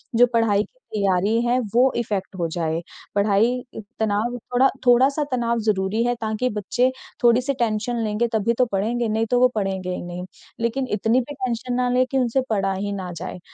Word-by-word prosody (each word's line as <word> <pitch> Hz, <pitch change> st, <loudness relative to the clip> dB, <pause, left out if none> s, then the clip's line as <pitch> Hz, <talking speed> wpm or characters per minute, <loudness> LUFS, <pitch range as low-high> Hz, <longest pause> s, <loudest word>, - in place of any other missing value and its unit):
जो 245 Hz, +2 st, +7 dB
पढ़ाई 215 Hz, -3 st, +3 dB
की -, -, -19 dB
तैयारी 200 Hz, +2 st, +2 dB
है 245 Hz, +1 st, +2 dB
वो 255 Hz, +2 st, +5 dB
इफेक्ट 205 Hz, -5 st, -3 dB
हो 170 Hz, -, 0 dB
जाए। 165 Hz, -1 st, -1 dB, 0.4 s
पढ़ाई 215 Hz, +5 st, +2 dB, 0.4 s
तनाव, 220 Hz, +3 st, 0 dB, 0.2 s
थोड़ा 260 Hz, +2 st, +5 dB, 0.2 s
थोड़ा 245 Hz, +2 st, +6 dB
सा 295 Hz, +1 st, -2 dB
तनाव 235 Hz, -2 st, 0 dB
ज़रूरी 200 Hz, +2 st, +1 dB
है 245 Hz, -, +2 dB
ताकि 220 Hz, +3 st, -1 dB
बच्चे 250 Hz, +6 st, +1 dB, 0.3 s
थोड़ी-सी 245 Hz, +3 st, +4 dB
टेंशन 230 Hz, +1 st, 0 dB
लेंगे 215 Hz, +2 st, 0 dB
तभी 220 Hz, +1 st, +2 dB
तो 255 Hz, -, +4 dB
पढ़ेंगे, 225 Hz, +5 st, 0 dB
नहीं 220 Hz, +1 st, 0 dB
तो 245 Hz, -, +4 dB
वो 255 Hz, -, +6 dB
पढ़ेंगे 190 Hz, -3 st, -2 dB
ही -, -, -5 dB
नहीं। 175 Hz, +1 st, -6 dB, 0.3 s
लेकिन 235 Hz, +3 st, -1 dB
इतनी 220 Hz, +4 st, +2 dB
भी 290 Hz, +4 st, -7 dB
टेंशन 255 Hz, -2 st, -3 dB
ना 250 Hz, 0 st, +1 dB
लें 255 Hz, +1 st, +3 dB
कि 270 Hz, -, +1 dB
उनसे 255 Hz, +1 st, +2 dB
पढ़ा 195 Hz, -2 st, +1 dB
ही 205 Hz, +2 st, -3 dB
ना 185 Hz, -2 st, -5 dB
जाए, -, -, -6 dB
230 Hz, 190 wpm, -23 LUFS, 200-245 Hz, 0.4 s, जो